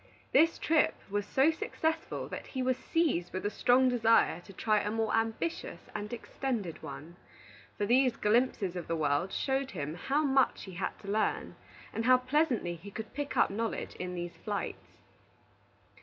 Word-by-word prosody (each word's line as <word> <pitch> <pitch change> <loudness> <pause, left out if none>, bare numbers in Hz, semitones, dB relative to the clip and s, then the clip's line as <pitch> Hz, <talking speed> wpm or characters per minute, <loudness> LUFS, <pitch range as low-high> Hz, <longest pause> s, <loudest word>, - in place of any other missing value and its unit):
This 330 +1 +5
trip 315 -1 +3 0.2
was 205 0 -1
so 270 +8 +4
successful 320 0 -2
that - - -6
he 260 -1 -3
was 255 0 +2
seized 260 - 0
with 185 - -3
a 205 - +1
strong 255 +3 +4
desire 230 -5 +4
to 195 - -13
try 215 +2 +2
a 210 - -2
more 225 0 0
ambitious 225 +9 -2
and 210 0 -4
extended 235 -6 -3
one; 170 +4 -9 0.6
for 205 - 0
these 250 +2 +4
glimpses 210 -5 +1
of 175 -2 -5
the 165 - 0
world 150 +4 +1
showed 270 0 0
him 150 - -4
how 275 - 0
much 270 -2 +2
he 190 - -8
had 180 +2 -3
to - - -11
learn, 215 +1 0 0.4
and 225 - -2
how 255 +1 +7
pleasantly 255 - +1
he 185 +5 -10
could 220 +2 -7
pick 290 0 -4
up - - +4
knowledge 225 +2 -3
in 180 0 -4
these 175 0 -5
flights. 205 -2 -5
225 Hz, 170 wpm, -31 LUFS, 190-265 Hz, 0.6 s, how